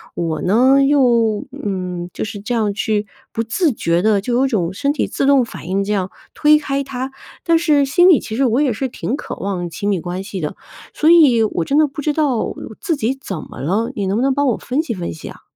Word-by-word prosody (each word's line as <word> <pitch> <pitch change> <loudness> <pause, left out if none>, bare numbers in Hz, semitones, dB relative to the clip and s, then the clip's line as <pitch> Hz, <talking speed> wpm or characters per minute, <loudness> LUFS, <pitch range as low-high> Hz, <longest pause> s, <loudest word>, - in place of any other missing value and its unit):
我 165 -2 -2
呢， 255 +8 +4
又， 235 -7 +2 0.2
嗯， 180 -3 -4
就 - - -4
是 210 -1 -6
这 235 +4 -3
样 210 -3 0
去 210 0 -1 0.3
不 225 - -1
自 295 - +1
觉 170 -3 0
地 215 -1 +3
就 240 +4 -3
有 265 +2 +3
种 190 -8 -1
身 280 +8 0
体 - - 0
自 - - -2
动 275 -4 +4
反 170 - -10
应 195 +1 0
这 205 - -3
样 190 -2 -1 0.2
推 300 0 +5
开 280 -2 -2
他， 260 0 -5 0.3
但 335 -1 +3
是 295 -4 +3
心 350 +7 +4
里 325 - +6
其 220 - -6
实 270 +2 +2
我 245 +4 +2
也 270 -6 +2
是 265 +5 -2
挺 245 +1 -3
渴 - - -6
望 180 -3 -3
亲 200 +5 -3
密 195 -4 +1
关 180 +3 -5
系 195 -3 -6
的， 150 - -4 0.4
所 315 +2 +3
以 275 -10 +6
我 170 -6 -1
真 285 - +1
的 310 - +5
不 295 +2 -7
知 300 +1 0
道 285 -7 0 0.3
自 330 -4 0
己 260 -1 -1
怎 190 -9 -5
么 - - -11
了， 210 - -1
你 200 -2 -2
能 200 +3 0
不 250 - +1
能 270 - +2
帮 285 +1 +1
我 240 - +1
分 265 +5 -1
析 235 -10 -4
分 175 -2 -4
析 160 - -9
啊？ - - -13
230 Hz, 260 characters per minute, -18 LUFS, 195-275 Hz, 0.4 s, 里